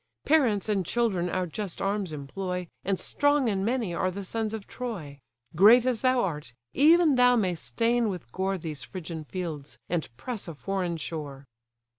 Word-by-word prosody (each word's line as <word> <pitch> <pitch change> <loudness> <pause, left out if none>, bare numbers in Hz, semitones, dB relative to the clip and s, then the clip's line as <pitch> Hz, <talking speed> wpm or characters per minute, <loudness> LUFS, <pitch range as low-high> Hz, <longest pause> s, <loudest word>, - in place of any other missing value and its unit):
Parents 245 -11 +3
and 205 -3 +1
children 190 -3 0
our 185 +1 -1
just 180 +2 -5
arms 195 -3 -1
employ, 180 +5 -4 0.2
And 195 -1 0
strong 290 -2 +2
and 195 -3 0
many 230 -4 0
are 185 +2 0
the 200 +2 -5
sons 220 +3 -2
of 220 -3 -5
Troy. 175 - -6 0.4
Great 225 +8 +7
as 250 -4 +1
thou 255 -1 +3
art, 150 -9 -4 0.2
even 320 +2 +6
thou 250 0 +6
may'st 180 - 0
stain 230 - +1
with 180 -11 -6
gore 190 +4 -1
These 155 -4 -5
Phrygian 165 -4 -7
fields, 160 -5 -6
and 170 -2 -1
press 235 - -5
a 165 - -6
foreign 180 +1 -2
shore." 145 -3 -6
190 Hz, 170 wpm, -27 LUFS, 165-230 Hz, 0.4 s, Great